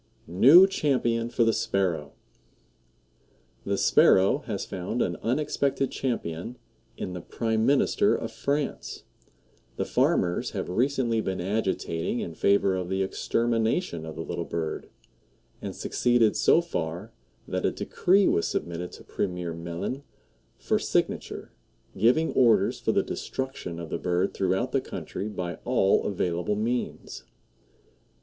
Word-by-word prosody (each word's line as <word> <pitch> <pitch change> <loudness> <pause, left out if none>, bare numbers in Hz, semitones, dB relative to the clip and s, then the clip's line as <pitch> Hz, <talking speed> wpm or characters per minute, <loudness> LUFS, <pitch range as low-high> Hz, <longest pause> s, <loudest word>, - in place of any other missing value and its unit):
NEW 135 - +7
CHAMPION 120 -10 0
FOR 120 - +1
THE 115 0 +3
SPARROW. 85 -7 -1 1.5
The 100 0 0
Sparrow 95 +9 +5
has 105 -4 -3
found 95 +5 -4
an - - 0
unexpected 135 +1 0
champion 115 -3 -3 0.4
in 90 - -5
the 90 - -6
Prime 110 +4 -1
Minister 145 +9 +3
of 115 - -4
France. 140 +4 -3 0.7
The - - -2
farmers 90 -1 +1
have - - -3
recently 120 +1 +1
been 95 -3 -3
agitating 95 0 -1
in 85 - -4
favor 100 +2 +2
of 90 -1 -3
the 95 0 0
extermination 115 - 0
of 80 0 -7
the 80 - -5
little 85 - -4
bird, 80 -1 -4 0.7
and - - -5
succeeded 120 -3 +2
so 170 - +4
far 90 - -4 0.4
that - - -2
a - - +3
decree 195 +2 +2
was 85 - +2
submitted 85 +1 -3
to - - -11
Premier 90 -3 -3
Meline 85 +10 -5 0.6
for - - 0
signature, - - -2 0.4
giving 125 +11 +3
orders 115 -6 +3
for - - 0
the - - +2
destruction 130 -10 -5
of 85 -2 -7
the - - -2
bird 90 +2 0
throughout 95 +7 0
the 135 - +1
country 95 -1 -6
by 90 -4 -5
all 120 -6 +2
available 90 0 -1
means. 120 +4 -3
105 Hz, 130 wpm, -27 LUFS, 90-125 Hz, 1.5 s, NEW